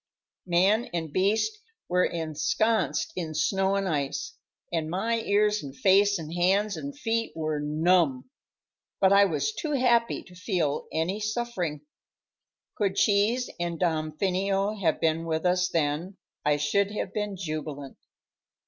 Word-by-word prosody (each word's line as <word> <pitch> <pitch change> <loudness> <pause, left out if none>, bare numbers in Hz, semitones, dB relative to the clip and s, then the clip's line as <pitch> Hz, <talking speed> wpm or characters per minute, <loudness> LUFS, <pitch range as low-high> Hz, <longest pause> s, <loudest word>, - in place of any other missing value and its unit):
Man 195 +7 +3
and 160 -3 -3
beast 220 - +1 0.3
were 180 0 +2
ensconced 170 - 0
in 160 -3 -4
snow 190 +5 +1
and 195 -1 0
ice, 155 - -2 0.4
and 160 -2 -1
my 225 +7 0
ears 210 -1 +2
and 135 -1 -9
face 200 +1 +4
and 160 -1 -7
hands 195 +4 +2
and 280 0 -6
feet 230 -5 -1
were 155 -2 -2
numb; 155 -2 +2 0.7
but 195 0 +5
I 200 0 +7
was 165 +3 -1
too 300 +6 -3
happy 240 -3 +2
to 180 - -17
feel 180 -5 -1
any 175 +6 -1
suffering. 215 -9 -2 0.9
Could 200 -2 -1
Cheese 215 +5 +2
and 170 -1 -3
Damfino 190 +5 0
have 160 -4 +1
been 160 0 +1
with 160 +1 -2
us 180 0 +2
then, 165 +4 -1 0.3
I 150 0 +2
should 195 +8 +1
have 195 -2 -4
been 210 -1 -2
jubilant. 155 -5 -5
185 Hz, 140 wpm, -27 LUFS, 160-210 Hz, 0.9 s, I